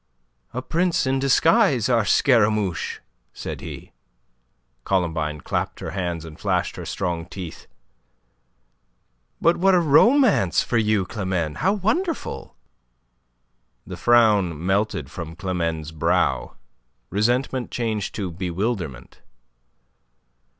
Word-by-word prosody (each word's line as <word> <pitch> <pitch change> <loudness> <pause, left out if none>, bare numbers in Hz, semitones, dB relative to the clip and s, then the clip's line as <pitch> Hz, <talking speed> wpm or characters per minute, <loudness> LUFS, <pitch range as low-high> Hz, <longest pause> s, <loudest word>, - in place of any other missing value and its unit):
"A 125 +1 -4
prince 170 +3 +1
in 135 0 +1
disguise, 135 -3 +3
our 115 -4 +2
Scaramouche!" 105 - +2 0.3
said - - -6
he. - - -9 0.9
Columbine 80 -5 -1
clapped - - -3
her - - -5
hands 85 -4 -3
and 80 -2 -11
flashed - - -1
her - - -7
strong 85 -2 -3
teeth. 90 -3 -8 1.7
"But 170 +1 +3
what 190 +1 +4
a - - +5
romance 175 - +4
for 120 - 0
you, 105 -3 +1
Climene! 90 -7 -3
How 190 +5 +2
wonderful!" 315 - -2 1.3
The - - -7
frown 105 -9 +3
melted 95 -7 0
from 80 -1 -7
Climene's 85 -4 -3
brow. 80 -4 0 0.6
Resentment 120 +4 0
changed 110 -5 -3
to 95 -4 -3
bewilderment. 90 - -4
100 Hz, 105 wpm, -23 LUFS, 85-125 Hz, 1.7 s, a